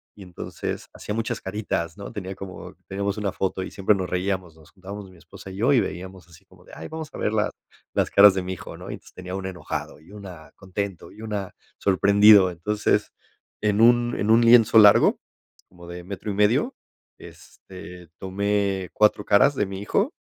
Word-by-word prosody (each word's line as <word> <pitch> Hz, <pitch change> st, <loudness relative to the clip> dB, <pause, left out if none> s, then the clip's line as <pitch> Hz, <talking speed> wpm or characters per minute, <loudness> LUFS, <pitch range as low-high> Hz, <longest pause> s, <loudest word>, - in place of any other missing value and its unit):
y 100 Hz, -, -12 dB
entonces 90 Hz, -2 st, -6 dB
hacía 105 Hz, -, -6 dB
muchas 115 Hz, +1 st, -2 dB
caritas, 95 Hz, -3 st, -4 dB
¿no? 100 Hz, -, -8 dB
Tenía 95 Hz, -4 st, -6 dB
como 95 Hz, -1 st, -10 dB
tenemos 100 Hz, +1 st, -3 dB
una 105 Hz, -2 st, -2 dB
foto 95 Hz, 0 st, -2 dB
y -, -, -5 dB
siempre 100 Hz, +1 st, +1 dB
nos 95 Hz, -3 st, -3 dB
reíamos, 90 Hz, -2 st, -2 dB
nos 80 Hz, -2 st, -20 dB
juntábamos 100 Hz, +1 st, -9 dB
mi 90 Hz, -, -18 dB
esposa 95 Hz, +3 st, -12 dB
y 95 Hz, -, -9 dB
yo, 115 Hz, +7 st, +2 dB
y 135 Hz, -, +5 dB
veíamos 95 Hz, -2 st, -7 dB
así 85 Hz, -1 st, -19 dB
como -, -, -21 dB
de, -, -, -17 dB
ay 80 Hz, -, -8 dB
vamos 160 Hz, -2 st, -7 dB
a -, -, -8 dB
ver -, -, 0 dB
las 110 Hz, -1 st, 0 dB, 0.4 s
las -, -, +1 dB
caras 100 Hz, 0 st, +7 dB
de 95 Hz, -, -2 dB
mi 90 Hz, +1 st, -4 dB
hijo, 90 Hz, -, -9 dB
¿no? -, -, -10 dB
Y -, -, -4 dB
entonces -, -, -17 dB
tenía 90 Hz, 0 st, -7 dB
una 95 Hz, 0 st, -4 dB
enojado, 90 Hz, -4 st, -6 dB
y 80 Hz, +5 st, -19 dB
una 95 Hz, -6 st, -11 dB
contento 95 Hz, -1 st, -6 dB
y 105 Hz, -, -14 dB
una 105 Hz, -4 st, -5 dB, 0.2 s
sorprendido. 100 Hz, 0 st, +5 dB
Entonces, 105 Hz, +5 st, -1 dB, 0.5 s
en 105 Hz, 0 st, +1 dB
un 120 Hz, +1 st, +4 dB
en 105 Hz, -, +1 dB
un 115 Hz, +1 st, +6 dB
lienzo 115 Hz, -1 st, +6 dB
largo, 105 Hz, -1 st, +6 dB, 0.5 s
como 85 Hz, -1 st, -15 dB
de 90 Hz, 0 st, -8 dB
metro 100 Hz, +3 st, -7 dB
y -, -, -3 dB
medio, 115 Hz, -, +2 dB, 0.4 s
este, 90 Hz, -2 st, -13 dB
tomé 100 Hz, -1 st, -1 dB
4, 105 Hz, -1 st, +3 dB
caras 135 Hz, +8 st, +4 dB
de 105 Hz, -, 0 dB
mi 95 Hz, 0 st, -7 dB
hijo 205 Hz, -, 0 dB
100 Hz, 200 wpm, -24 LUFS, 95-105 Hz, 0.5 s, caras